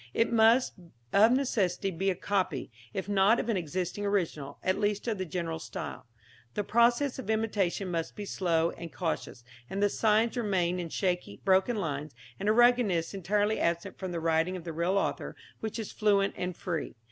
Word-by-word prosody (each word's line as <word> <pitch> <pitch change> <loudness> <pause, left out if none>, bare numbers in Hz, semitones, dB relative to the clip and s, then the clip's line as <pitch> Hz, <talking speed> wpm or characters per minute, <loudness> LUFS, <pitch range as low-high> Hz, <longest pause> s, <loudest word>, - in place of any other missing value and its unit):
It 230 - +2
must 230 +3 +5 0.4
of 220 +3 +6
necessity 205 -8 +1
be 190 +3 0
a 185 - 0
copy, 185 -9 -1 0.2
if 190 +7 -4
not 205 +3 +4
of 235 - -3
an 225 - +2
existing 180 +3 -3
original, 170 -8 -1
at 185 - +1
least 210 +1 0
of 220 -4 -1
the 185 - -1
general 165 -1 -3
style. 145 - -7 0.5
The 210 - 0
process 240 +6 +2
of 240 - -7
imitation 205 -4 0
must 165 -1 -3
be 210 - -5
slow 170 -4 +1
and 170 -1 -8
cautious, 160 -7 -3 0.3
and 195 - -3
the 205 0 +3
signs 220 +3 +2
remain 185 -6 0
in 170 -2 -4
shaky, 180 - -2
broken 190 +5 +3
lines, 150 - -3 0.2
and 205 - 0
a - - +6
ruggedness 230 -8 +3
entirely 205 +3 0
absent 170 +3 -1
from 185 -2 -4
the 170 - -2
writing 165 +3 +1
of 175 - -9
the 165 -1 -5
real 170 +4 +1
author, - - -2 0.2
which 220 0 -4
is 220 -3 -5
fluent 200 -2 +2
and 180 -1 -4
free. 170 -4 -3
195 Hz, 185 wpm, -29 LUFS, 170-215 Hz, 0.5 s, of